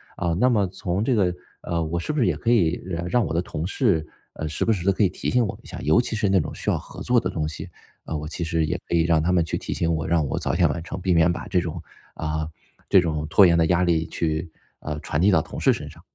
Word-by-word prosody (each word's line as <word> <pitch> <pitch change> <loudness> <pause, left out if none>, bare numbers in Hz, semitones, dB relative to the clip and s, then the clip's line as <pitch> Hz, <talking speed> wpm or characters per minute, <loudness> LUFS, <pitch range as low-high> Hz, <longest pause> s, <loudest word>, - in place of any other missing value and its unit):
啊， 85 -1 -1
那 125 +3 +4
么 105 -5 +2
从 90 +1 -2
这 130 - +1
个 95 -6 +2 0.3
呃， 85 -1 -2
我 85 +2 -2
是 120 - -3
不 150 - -1
是 120 - +3
也 - - +1
可 115 - -2
以 90 -8 +2 0.3
让 120 -3 +2
我 80 - -3
的 85 - +1
同 80 -2 -4
事， 100 - +1 0.3
呃， 80 - -4
时 75 - -2
不 115 - +2
时 90 -4 -1
地 100 - +5
可 105 - +1
以 95 - +4
提 - - -4
醒 125 -1 +3
我 100 0 -5
一 - - -16
下， - - -7
尤 80 +6 +4
其 120 - -3
是 105 -2 +1
那 95 -1 +4
种 75 - -3
需 - - -3
要 - - +2
合 - - -10
作 125 -1 +4
的 - - -2
东 75 -2 -2
西， 80 - -7 0.4
啊， 80 - -4
我 75 0 -4
其 85 - -6
实 80 -1 0
也 85 +3 -2
可 85 - 0
以 80 - +4
让 80 -2 +3
他 90 +3 +1
们 85 -2 +3
去 80 - -3
提 - - -4
醒 85 -1 0
我， 80 -1 -2
让 80 -2 +2
我 - - -2
早 - - -1
点 - - +3
完 85 - -3
成， 95 - -6
避 90 0 +1
免 85 +1 +4
把 85 - -5
这 90 - +2
种 85 -1 -4 0.3
啊， 80 0 -3 0.4
这 95 - +6
种 75 -3 -2
拖 100 +4 +7
延 85 -1 +4
的 80 - +4
压 90 +2 +2
力 85 -2 +2
去， 80 +1 -2 0.3
呃， 75 -1 -5
传 75 -1 -2
递 95 - +4
到 - - +4
同 - - -8
事 - - +4
身 - - -6
上。 - - -15
85 Hz, 315 characters per minute, -24 LUFS, 80-95 Hz, 0.4 s, 拖